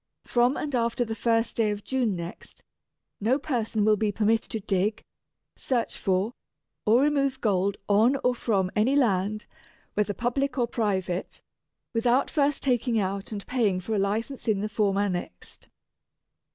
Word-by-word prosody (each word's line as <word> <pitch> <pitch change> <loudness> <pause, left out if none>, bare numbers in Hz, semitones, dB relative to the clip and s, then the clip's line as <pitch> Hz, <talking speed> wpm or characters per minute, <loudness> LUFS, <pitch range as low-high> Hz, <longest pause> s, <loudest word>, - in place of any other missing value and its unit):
From 245 +2 +2
and 290 -2 -4
after 235 0 +1
the 225 - -3
first 225 0 0
day 225 -2 +3
of 205 0 -3
June 250 -7 0
next, 170 0 -9 0.6
no 230 +6 +2
person 225 -7 -1
will 215 -1 +4
be 210 0 +1
permitted 220 +2 +1
to 220 - -3
dig, 205 +2 -1 0.5
search 245 -3 -1
for, 195 +4 0 0.5
or 235 +5 +5
remove 275 -3 +1
gold 200 -3 +1
on 220 +6 +4
or 250 - +3
from 195 -6 0
any 235 +6 +3
land, 210 -5 +1 0.5
whether 205 -1 0
public 255 +5 -1
or 240 -2 +2
private, 190 -6 -2 0.5
without 240 +3 +2
first 290 -1 +1
taking 245 -3 +1
out 195 0 -2
and 205 -2 -5
paying 220 -8 +1
for 200 +5 -4
a 210 - +1
License 220 +8 -2
in 205 -3 +2
the 210 - -2
form 205 -2 +1
annexed. 180 - -4
220 Hz, 155 wpm, -26 LUFS, 200-245 Hz, 0.6 s, or